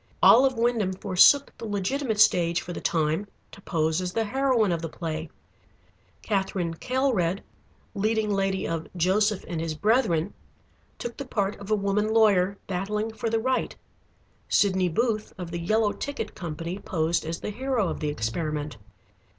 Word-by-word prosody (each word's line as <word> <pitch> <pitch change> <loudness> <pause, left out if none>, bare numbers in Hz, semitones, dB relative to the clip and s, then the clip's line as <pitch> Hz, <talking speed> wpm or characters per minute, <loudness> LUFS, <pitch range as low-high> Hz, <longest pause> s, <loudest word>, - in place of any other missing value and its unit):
"Olive 260 +1 +6
Wyndham 230 -5 +1
forsook 195 +9 +4
the - - -6
legitimate 215 +3 -1
stage 170 -4 +4
for 175 - -6
the - - -6
time 160 +4 0 0.2
to 200 - -13
pose 160 -1 0
as 180 0 -4
the 225 - +1
heroine 245 -3 +1
of 170 -1 -1
the 165 - -4
play. 160 -1 -5 0.9
Katherine 190 -4 -1
Kaelred, 215 -4 0 0.5
leading 215 0 0
lady 195 -1 0
of 165 -1 -3
'Joseph 200 +4 +2
and 165 -2 -3
his 165 -1 -3
Brethren,' 205 -3 +1 0.6
took 240 0 -6
the 275 - -5
part 205 -4 -1
of 200 0 -9
a 215 - +3
woman 210 +1 0
lawyer 200 -3 +3
battling 210 +4 -2
for 225 +1 -3
the 225 0 +1
right. 260 +3 -1 0.7
Sydney 185 -3 +3
Booth, 215 +4 -1
of 175 -2 -6
the 170 - -3
'Yellow 215 +4 +2
Ticket' 285 -5 -5
company 170 +2 -5
posed 165 -3 -1
as 165 +1 -4
the - - -4
hero 250 -2 -1
of - - -4
the 150 - -1
experiment. 145 +3 -3
195 Hz, 160 wpm, -26 LUFS, 170-220 Hz, 0.9 s, Olive